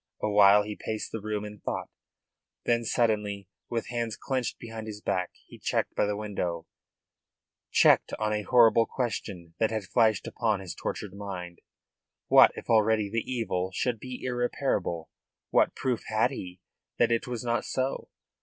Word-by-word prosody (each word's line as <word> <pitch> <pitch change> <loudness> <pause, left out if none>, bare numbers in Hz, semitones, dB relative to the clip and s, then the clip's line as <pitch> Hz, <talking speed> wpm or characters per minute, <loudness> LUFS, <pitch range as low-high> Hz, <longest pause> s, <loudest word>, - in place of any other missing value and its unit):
Awhile 105 -1 +6
he 105 0 -5
paced 110 +1 -4
the 110 - -4
room 105 0 -3
in 105 0 -9
thought. - - -3 0.8
Then, 120 0 +2
suddenly, 105 -4 0 0.2
with 115 -2 -3
hands 115 -2 -2
clenched 130 -3 -2
behind 115 -1 -8
his 105 -1 -6
back, 90 -3 -1 0.2
he - - -14
checked - - -1
by - - +1
the 105 0 -1
window, 90 -6 -3 1.0
checked - - +5
on 105 0 0
a 105 - 0
horrible 115 0 +5
question 100 -9 -4
that 110 - +3
had 110 -2 -2
flashed 110 +2 +2
upon 110 -4 0
his 95 -2 -6
tortured 100 -3 -5
mind. 95 -4 -7 0.7
What - - +8
if - - -8
already 110 -2 +3
the 115 +2 -2
evil 95 -7 -1
should 120 -3 0
be 125 +1 -7
irreparable? 120 - -1 0.4
What - - +3
proof 125 -3 -1
had 110 +4 +2
he 90 -8 -8 0.4
that - - +3
it 115 +1 +1
was 120 -2 -4
not 120 -1 0
so? 130 +1 -2
110 Hz, 160 wpm, -28 LUFS, 100-115 Hz, 1.0 s, What